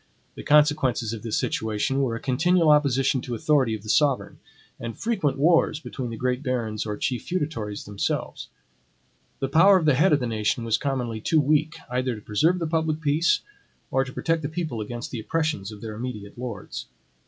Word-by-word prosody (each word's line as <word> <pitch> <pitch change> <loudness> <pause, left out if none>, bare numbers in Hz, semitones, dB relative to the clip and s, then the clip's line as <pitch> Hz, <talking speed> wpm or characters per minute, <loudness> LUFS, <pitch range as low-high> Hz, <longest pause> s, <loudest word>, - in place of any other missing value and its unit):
The - - -9
consequences 145 -6 +3
of 110 - -6
this 115 -1 -2
situation 110 +5 -1
were 120 -4 0
a - - -4
continual 160 +6 +3
opposition 135 -3 +3
to 120 -2 -4
authority 130 -3 +2
of 105 - -9
the 110 - -9
sovereign, 145 0 +1 0.4
and 115 -1 -6
frequent 190 -13 0
wars 160 +1 +3
between 130 -5 -6
the 115 - -6
great 125 +2 -1
barons 115 -6 -2
or 105 -1 -3
chief 125 -2 -1
feudatories 145 - -3
themselves. 100 -1 -3 0.9
The 135 - +1
power 180 +8 +6
of 170 - -1
the 150 - +5
head 155 +8 +4
of 150 - +4
the 125 - -2
nation 115 +3 -1
was 115 -1 +1
commonly 125 -5 -2
too 160 +7 +2
weak, 150 +2 +2
either 125 0 -1
to 105 - -10
preserve 155 - +2
the 170 - -2
public 160 -1 0
peace, 155 +2 +2 0.5
or 135 +1 +2
to 135 - -8
protect 165 +4 -1
the 145 - -3
people 160 -8 -3
against 120 +3 -6
the 120 - -4
oppressions 150 -6 -2
of 105 -1 -11
their 110 -1 -6
immediate 105 -3 -6
lords. 120 -5 -6
130 Hz, 190 wpm, -25 LUFS, 115-155 Hz, 0.9 s, power